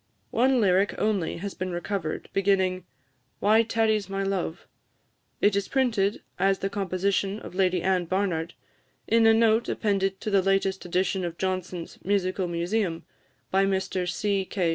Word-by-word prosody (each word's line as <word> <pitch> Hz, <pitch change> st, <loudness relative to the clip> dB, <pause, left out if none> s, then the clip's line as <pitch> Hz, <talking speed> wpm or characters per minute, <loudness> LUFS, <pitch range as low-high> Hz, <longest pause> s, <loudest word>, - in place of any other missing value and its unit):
One 255 Hz, +2 st, +3 dB
lyric 195 Hz, -1 st, +3 dB
only 205 Hz, -6 st, 0 dB
has 200 Hz, +3 st, -5 dB
been 185 Hz, 0 st, -4 dB
recovered, 175 Hz, -2 st, -3 dB
beginning, 190 Hz, -2 st, +1 dB, 0.5 s
"Why 215 Hz, +2 st, +5 dB
tarries 220 Hz, -3 st, +1 dB
my 195 Hz, 0 st, -2 dB
love?" 190 Hz, -3 st, -3 dB, 0.8 s
It 205 Hz, -1 st, +4 dB
is 200 Hz, 0 st, 0 dB
printed 230 Hz, -7 st, +1 dB, 0.2 s
as 195 Hz, 0 st, +3 dB
the 195 Hz, -, -3 dB
composition 195 Hz, +1 st, -1 dB
of -, -, -9 dB
Lady 185 Hz, -2 st, +1 dB
Anne 185 Hz, -2 st, +1 dB
Barnard, 175 Hz, -3 st, -1 dB, 0.5 s
in 225 Hz, 0 st, +4 dB
a 225 Hz, -, +7 dB
note 225 Hz, 0 st, +3 dB
appended 195 Hz, -2 st, 0 dB
to 215 Hz, -, -3 dB
the 195 Hz, -1 st, +4 dB
latest 195 Hz, 0 st, 0 dB
edition 185 Hz, +1 st, 0 dB
of 170 Hz, -1 st, -4 dB
Johnson's 185 Hz, -2 st, -4 dB
"Musical 185 Hz, -1 st, 0 dB
Museum," 175 Hz, +1 st, -1 dB, 0.5 s
by 195 Hz, +1 st, +3 dB
Mr 190 Hz, -2 st, -1 dB
C. 200 Hz, +2 st, 0 dB
K. 180 Hz, -2 st, -1 dB
195 Hz, 150 wpm, -26 LUFS, 185-205 Hz, 0.8 s, a